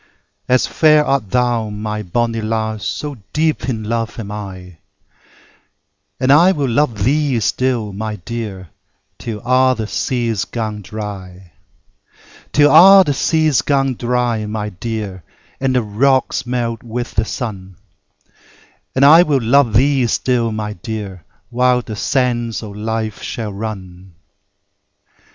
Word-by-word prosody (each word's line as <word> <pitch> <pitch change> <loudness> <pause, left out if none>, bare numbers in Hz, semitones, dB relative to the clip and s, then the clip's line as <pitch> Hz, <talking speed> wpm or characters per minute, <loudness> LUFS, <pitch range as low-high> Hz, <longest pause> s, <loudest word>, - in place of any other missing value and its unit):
As 125 0 +3
fair 155 -1 +4 0.2
thou 120 +1 0
art, 105 - -7
my 105 0 -4
bonnie 115 +4 -1
lass, 110 -1 -2
So 145 -3 -4 0.2
deep 155 -2 0
in 110 -4 -3
love 115 +1 -3
am 105 -2 -6
I: 95 -5 -8 1.4
And 130 +1 +2
I 170 +6 +6
will 145 -5 -1
love 120 -4 0
thee 140 0 +1
still, 115 -2 -1
my 110 +2 -4
dear, 100 -3 -7 0.5
Till 110 -3 -5
a' 130 +1 +3
the 110 - -3
seas 115 -2 -2
gang 110 -3 -4
dry: 95 -3 -8 1.0
Till 145 0 +4
a' 190 +4 +9
the 145 - 0
seas 155 -2 +2
gang 135 -1 +1
dry, 120 -2 -1
my 105 0 -3
dear, 105 -1 -5 0.4
And 130 -1 0
the 125 - +2
rocks 125 +5 +1
melt 120 -2 -2
with 120 +1 -5
the 110 - +1
sun; 100 -6 -6 1.2
I 150 +5 +8
will 150 -6 +2
luve 120 0 +3
thee 135 0 +3
still 120 -1 0
my 105 -1 -4
dear, 100 -2 -7 0.3
When 125 0 +2
the 110 - -6
sands 120 -2 -1
of 105 -2 -8
life 110 0 -3
shall 110 -3 -5
run. 95 -4 -8
115 Hz, 135 wpm, -17 LUFS, 105-130 Hz, 1.4 s, a